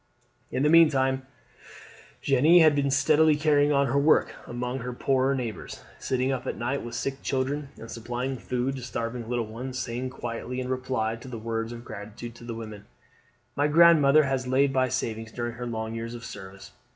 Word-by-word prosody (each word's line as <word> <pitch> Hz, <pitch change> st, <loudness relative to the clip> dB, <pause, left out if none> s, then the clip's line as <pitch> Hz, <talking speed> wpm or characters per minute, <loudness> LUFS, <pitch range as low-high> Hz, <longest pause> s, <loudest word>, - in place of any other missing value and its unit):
In 130 Hz, -, 0 dB
the 150 Hz, -, +4 dB
meantime 135 Hz, -5 st, +4 dB, 1.0 s
Jeanne 145 Hz, +6 st, +5 dB
had 155 Hz, -3 st, +6 dB
been 140 Hz, -1 st, +1 dB
steadily 150 Hz, +3 st, +4 dB
carrying 145 Hz, -1 st, +3 dB
on 140 Hz, -1 st, +3 dB
her 140 Hz, +2 st, +1 dB
work 150 Hz, +2 st, +3 dB
among 125 Hz, +2 st, -3 dB
her 125 Hz, 0 st, -5 dB
poorer 135 Hz, +2 st, +1 dB
neighbours, 120 Hz, -4 st, -5 dB, 0.2 s
sitting 130 Hz, +1 st, 0 dB
up 130 Hz, -2 st, -3 dB
at -, -, -3 dB
night 130 Hz, +4 st, -2 dB
with 120 Hz, -, -7 dB
sick 135 Hz, 0 st, -3 dB
children, 140 Hz, +2 st, -2 dB
and 115 Hz, -, -10 dB
supplying 120 Hz, +3 st, -3 dB
food 125 Hz, +2 st, -2 dB
to -, -, -7 dB
starving 115 Hz, -1 st, -4 dB
little 120 Hz, -2 st, -1 dB
ones, 125 Hz, +4 st, -6 dB
saying 125 Hz, +1 st, -3 dB
quietly 120 Hz, 0 st, -5 dB
in 130 Hz, 0 st, -4 dB
reply 130 Hz, -3 st, -1 dB
to 120 Hz, -, -12 dB
the 125 Hz, -2 st, -6 dB
words 115 Hz, +1 st, -3 dB
of 120 Hz, 0 st, -9 dB
gratitude 110 Hz, +4 st, -9 dB
of 120 Hz, -, -10 dB
the 115 Hz, -, -4 dB
women: 110 Hz, -2 st, -8 dB, 0.7 s
"My 145 Hz, +1 st, +2 dB
grandmother 155 Hz, -2 st, +6 dB
has 135 Hz, -2 st, -1 dB
laid 135 Hz, +2 st, +2 dB
by 130 Hz, -1 st, +2 dB
savings 115 Hz, -3 st, -3 dB
during 120 Hz, 0 st, -4 dB
her 120 Hz, +1 st, -6 dB
long 110 Hz, -1 st, -4 dB
years 115 Hz, +1 st, -5 dB
of 115 Hz, -1 st, -9 dB
service. 95 Hz, -2 st, -10 dB
130 Hz, 190 wpm, -27 LUFS, 115-140 Hz, 1.0 s, had